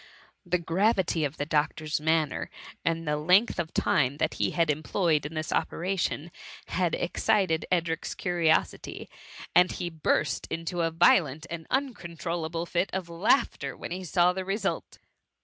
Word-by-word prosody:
The 180 -1 +1
gravity 180 0 +1
of 145 +2 -5
the 145 - -2
doctor's 150 0 0
manner, 160 -2 +1 0.3
and 165 -1 -1
the 150 0 +1
length 180 +8 +3
of 160 -2 -2
time 140 -1 +1
that 155 +1 0
he - - +3
had 165 -3 +2
employed 155 0 0
in 160 - -10
this 155 0 -3
operation, 175 -2 -1 0.4
had 180 -3 +1
excited 185 -2 +1
Edric's 170 -2 -1
curiosity, 170 -3 0 0.5
and 180 +1 +6
he 175 -2 -4
burst 155 -1 0
into 165 +1 -3
a 165 - +2
violent 160 -2 +3
and 165 -1 -6
uncontrollable 170 - -2
fit 175 +2 0
of 185 -2 -3
"laughter 175 +11 +1
wli*en - - -7
he 185 +1 -4
saw 180 +1 +3
the 190 0 -3
result. 195 +3 -3
170 Hz, 150 wpm, -28 LUFS, 160-180 Hz, 0.5 s, and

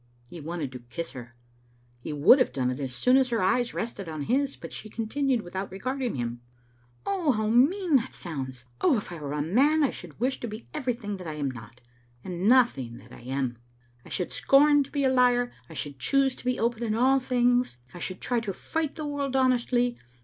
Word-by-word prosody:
He 165 +5 -9
wanted 155 -3 -4
to 125 - -8
kiss 165 +8 -6
her. 120 -1 -10 0.6
He 120 - -6
would 150 - +6
have 255 - +2
done 125 -2 0
it 125 - -5
as 135 -2 -3
soon 250 - +4
as 265 -2 +3
her 230 -2 0
eyes 235 +6 +1
rested 205 -6 -4
on 155 -2 -4
his, 275 - +1
but - - -9
she 215 - -7
continued 235 +2 -1
without 190 +2 -5
regarding 255 +6 -3
him 120 -1 -3 0.3
— 120 0 -35
"How 290 - +1
mean 300 - +4
that 230 - -3
sounds! 130 -7 -6 0.2
Oh, 255 - +4
if 200 - -5
I 170 - -6
were 145 -1 -4
a 150 -1 -1
man 280 - +3
I 275 - +2
should 170 -2 -10
wish 260 +3 0
to 240 - -4
be 215 +1 -8
everything 245 -8 -3
that 180 -2 -8
I 155 - -4
am 140 -3 -2
not, 115 0 -12 0.4
and 180 +3 -1
nothing 230 - +3
that - - -16
I - - -12
am. 130 -1 -3 0.4
I - - -14
should 180 - -2
scorn 290 +1 +5
to - - -17
be 285 -1 0
a 265 - +4
liar, 245 -1 +3 0.2
I 160 - -10
should 145 -3 -5
choose 270 - +2
to - - -13
be 250 0 +1
open 235 0 0
in 220 -2 0
all 260 +3 +4
things, 245 - +2 0.2
I 175 - -8
should 185 +1 -5
try 245 -1 0
to 220 -3 -3
fight 320 - -3
the 310 - -5
world 285 -2 -2
honestly. 245 -2 +2
225 Hz, 220 wpm, -27 LUFS, -, 0.6 s, would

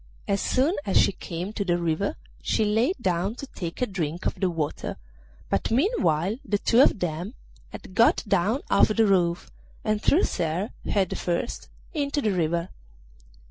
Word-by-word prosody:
As 200 0 +1
soon 275 +7 +2
as 195 - +1
she - - +5
came 180 +2 -6
to 210 - -2
the 175 -3 +1
river 170 +3 -1 0.3
she 220 - +1
lay 225 - +2
down 185 +1 0
to 275 - -7
take 175 -3 -5
a - - +4
drink 175 -5 -4
of - - +1
the 190 - 0
water, 160 -4 -3 0.5
but - - 0
meanwhile 225 - +1
the 205 0 0
two 230 +4 +4
of 275 - +5
them 175 - -3 0.3
had - - -10
got 230 +5 +4
down 205 +7 +2
off - - +6
the 220 +1 +3
roof 175 -4 +1 0.3
and 215 -1 0
thrust 330 - +2
her, 175 +6 -1
head 195 -4 0
first, 175 +6 -2 0.2
into 290 -2 -1
the 220 -7 +1
river. 170 -1 0
195 Hz, 170 wpm, -26 LUFS, 175-225 Hz, 0.5 s, off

